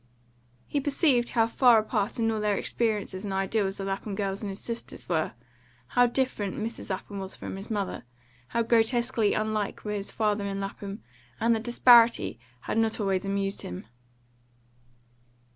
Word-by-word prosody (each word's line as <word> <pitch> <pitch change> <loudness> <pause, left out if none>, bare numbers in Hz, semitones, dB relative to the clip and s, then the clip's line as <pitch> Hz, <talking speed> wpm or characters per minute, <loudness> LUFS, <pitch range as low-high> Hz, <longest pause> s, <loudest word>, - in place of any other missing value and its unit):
He 285 - -1
perceived 275 -4 +2
how 225 -1 +3
far 235 +1 +5
apart 215 -1 0
in 225 -1 +1
all 220 -1 -2
their 210 -1 +1
experiences 210 -4 -1
and 205 - -4
ideals 195 +1 0
the 195 - -4
Lapham 195 +1 -3
girls 195 -1 -2
and 210 - -3
his 195 - -5
sisters 235 0 -6
were; 160 -7 0 0.6
how 245 0 +4
different 235 -6 -1
Mrs. 225 +1 -5
Lapham 195 +1 -4
was 190 0 -5
from - - -6
his 195 +2 -8
mother; 200 - -2 0.4
how 235 - 0
grotesquely 230 -1 +2
unlike 215 -1 -2
were 210 - -2
his 205 -1 -4
father 210 -2 0
and 195 0 -3
Lapham; 200 +1 -6 0.4
and 230 +1 +3
the - - -1
disparity 235 - +5 0.2
had 225 - -1
not 225 0 +1
always 195 -2 0
amused 195 0 -1
him. 90 +2 -7
215 Hz, 160 wpm, -27 LUFS, 195-230 Hz, 0.6 s, far